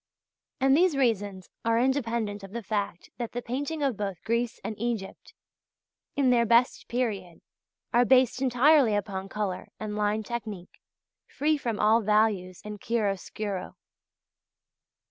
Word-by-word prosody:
And 270 0 +4
these 340 -2 +3
reasons 205 -7 0 0.2
are 230 0 +2
independent 235 -5 0
of 195 +1 -10
the 235 -1 -4
fact 200 -4 -3
that 235 -2 -4
the 245 - -3
painting 285 +5 -3
of 265 -7 0
both 195 -4 -4
Greece 235 +1 -1
and 220 - -4
Egypt 230 -4 -4 0.8
in 270 -3 +3
their 235 -1 +4
best 235 +3 +3
period 205 -8 -2 0.5
are 240 +1 +5
based 255 0 +4
entirely 260 -2 +4
upon 195 -1 -3
colour 200 -3 -3
and 215 -1 -4
line 210 +1 0
technique 215 -5 -6 0.5
free 305 +2 +1
from 235 -7 -3
all 220 +2 +4
values 210 -4 +1
and 210 -1 -7
chiaroscuro. 205 -3 -2
225 Hz, 135 wpm, -27 LUFS, 205-245 Hz, 0.8 s, are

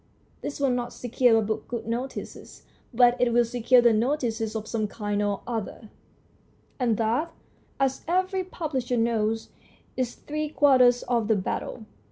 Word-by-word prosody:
This 290 - -5
will 275 -2 +2
not 245 -1 -2
secure 245 -1 +2
a 220 - +2
book 220 +1 -3
good 235 -2 -5
notices, 240 +4 -6 0.3
but 245 0 +5
it 245 -1 +3
will 240 0 +4
secure 245 +1 +3
it 230 -2 +6
notices 225 -3 -1
of 220 -1 -4
some 215 -2 -1
kind 205 -1 -3
or 205 -1 -1
other, 225 -2 -5 0.9
and 235 -4 +1
that, 235 +9 0 0.5
as 270 -1 0
every 370 +2 +1
publisher 270 -9 -3
knows, 225 -1 0 0.5
is 255 -2 -2
three 305 0 -4
quarters 260 -4 +4
of 235 -3 0
the 220 - +3
battle. 200 +3 -4
240 Hz, 155 wpm, -26 LUFS, 225-260 Hz, 0.9 s, it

